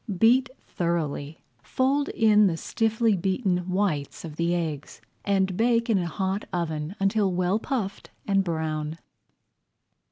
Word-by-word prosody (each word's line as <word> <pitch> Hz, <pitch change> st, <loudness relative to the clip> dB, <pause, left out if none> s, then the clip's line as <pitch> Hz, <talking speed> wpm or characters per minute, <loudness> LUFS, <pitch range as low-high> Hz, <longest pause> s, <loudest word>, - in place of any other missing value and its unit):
Beat 245 Hz, +5 st, +4 dB, 0.2 s
thoroughly, 160 Hz, -3 st, -3 dB, 0.2 s
fold 275 Hz, -, 0 dB
in 210 Hz, -2 st, +4 dB
the 165 Hz, -3 st, -1 dB
stiffly 225 Hz, +2 st, +1 dB
beaten 185 Hz, -1 st, -1 dB
whites 180 Hz, -7 st, -1 dB
of 155 Hz, -2 st, -8 dB
the 170 Hz, +2 st, 0 dB
eggs, 155 Hz, -4 st, -4 dB, 0.3 s
and 190 Hz, -2 st, +1 dB
bake 230 Hz, +2 st, +2 dB
in 205 Hz, -, +3 dB
a 175 Hz, -, -2 dB
hot 190 Hz, +4 st, -2 dB
oven 160 Hz, 0 st, -3 dB
until 195 Hz, 0 st, +2 dB
well 180 Hz, +3 st, +1 dB
puffed 220 Hz, -6 st, -4 dB, 0.2 s
and 195 Hz, -1 st, +2 dB
brown. 160 Hz, -2 st, -3 dB
190 Hz, 130 wpm, -26 LUFS, 165-215 Hz, 0.3 s, Beat